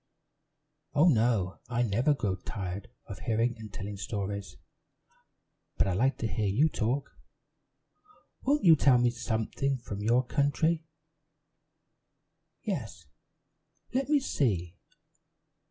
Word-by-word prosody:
"Oh, 155 +5 +6
no, 110 - +2
I 120 0 +1
never 120 +7 +2
grow 100 -8 -1
tired 95 0 -6 0.2
of - - -8
hearing 115 +2 +1
and 110 -2 -9
telling 100 +1 -6
stories; 100 -5 -4 1.2
but - - +3
I 95 - 0
like 130 +8 +2
to 115 - -2
hear 110 -1 -1
you 130 +12 +3
talk. 130 +2 -1 1.3
Won't 290 +2 +1
you 165 -4 +8
tell 135 -4 +5
me 120 0 +3
something 120 +3 -1
from 105 -4 -6
your 120 +4 +3
country?" 160 +4 +1 1.8
"Yes 115 - -4 0.9
let 270 +2 0
me 300 -1 +5
see. 95 - -1
115 Hz, 115 wpm, -29 LUFS, 100-140 Hz, 1.8 s, you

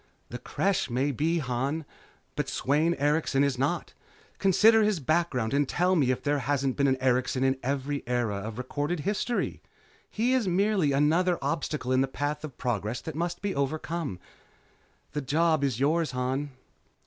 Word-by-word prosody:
"The - - -6
Creche 195 -6 0
may 130 +4 0
be, 160 +6 0
Han, 140 +2 -2 0.5
but - - -2
Sweyn 155 +5 +1
Erikson 145 -1 +1
is 140 -3 0
not. 145 +6 -1 0.5
Consider 220 +4 +5
his 210 -4 +2
background 140 -6 0
and 140 -1 +2
tell 180 +1 +2
me 140 -7 +2
if 130 - -1
there 145 0 +1
hasn't 135 0 0
been 140 -1 +2
an 130 -1 +2
Erikson 130 0 +1
in 135 0 +1
every 140 +2 -2
era 120 -5 0
of 105 +2 -6
recorded 145 +6 -2
history. 210 +6 -1 0.5
He 240 +4 +1
is 250 -6 +1
merely 190 -3 +2
another 165 +6 +2
obstacle 150 -5 -2
in 130 0 +4
the 135 - +1
path 145 +3 -3
of 145 -5 -8
progress 115 -1 -2
that 160 - -6
must 175 +4 -3
be 200 -1 -1
overcome. 150 - -2 0.9
The 150 - -2
job 155 +2 +2
is 130 -4 0
yours, 155 +4 +2
Han." 130 +3 -1
145 Hz, 165 wpm, -28 LUFS, 130-170 Hz, 0.9 s, Consider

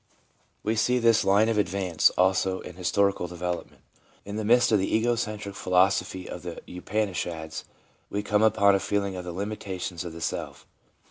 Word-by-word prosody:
We 110 +2 0
see 125 +3 +2
this 115 -2 +4
line 100 +3 +4
of 115 -2 +1
advance, 95 -3 +2
also, 95 0 +2
in - - -9
historical 95 +1 +1
de 90 - -10
velopment. 90 0 -4 0.4
In 100 +1 -6
the 110 - -2
midst 120 +3 +4
of 105 - +4
the 95 - 0
ego 115 +2 +2
centric 105 -3 -4
philosophy 95 -1 +1
of 90 - -7
the 85 0 -7 0.2
Upanishads, 90 -5 -3 0.4
we 105 +1 -2
come 105 0 +1
upon 105 -2 +5
a 100 - +3
feeling 100 -1 -1
of 90 -1 -6
the 90 - -4
limita 100 0 -5
tions 90 -2 -4
of 85 -2 -7
the 85 - -8
self. - - -4
100 Hz, 185 wpm, -26 LUFS, 90-105 Hz, 0.4 s, upon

